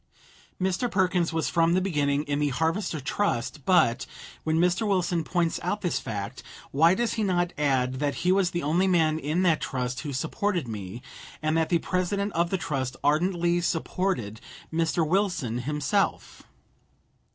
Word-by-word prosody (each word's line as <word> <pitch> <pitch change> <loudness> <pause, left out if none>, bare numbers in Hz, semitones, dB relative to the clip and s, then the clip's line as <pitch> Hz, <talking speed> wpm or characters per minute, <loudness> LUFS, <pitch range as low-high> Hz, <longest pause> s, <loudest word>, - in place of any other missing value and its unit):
Mr. 190 +6 0
Perkins 180 -4 +1
was 160 -1 -1
from 165 0 +2
the 185 - +3
beginning 145 -6 0
in 145 -1 -2
the 145 -1 +1
Harvester 160 +5 -1
Trust 135 -3 -2
but, 125 -10 +3 0.4
when 160 0 +1
Mr. 180 +5 +2
Wilson 180 -4 +1
points 170 0 0
out 205 +4 -2
this 175 - 0
fact, 105 -5 -5 0.3
why 165 +6 +5
does 235 +2 0
he 220 - -1
not 175 -3 +1
add 130 -3 +1
that 145 -1 0
he 180 - +5
was 190 -1 +3
the 175 -1 -3
only 170 +6 +2
man 160 -4 +2
in 160 +5 0
that 165 -4 +3
trust 125 -1 -3
who 150 - -5
supported 160 +4 -1
me, 105 +1 -6 0.4
and 155 +1 0
that 160 -1 +1
the 175 - +4
President 195 +3 -1
of 170 +1 +1
the 190 - 0
trust 135 -6 -3
ardently 175 +3 +2
supported 165 - -2 0.3
Mr. 165 0 +1
Wilson 175 - 0
himself? 150 - -1
165 Hz, 165 wpm, -26 LUFS, 145-185 Hz, 0.4 s, why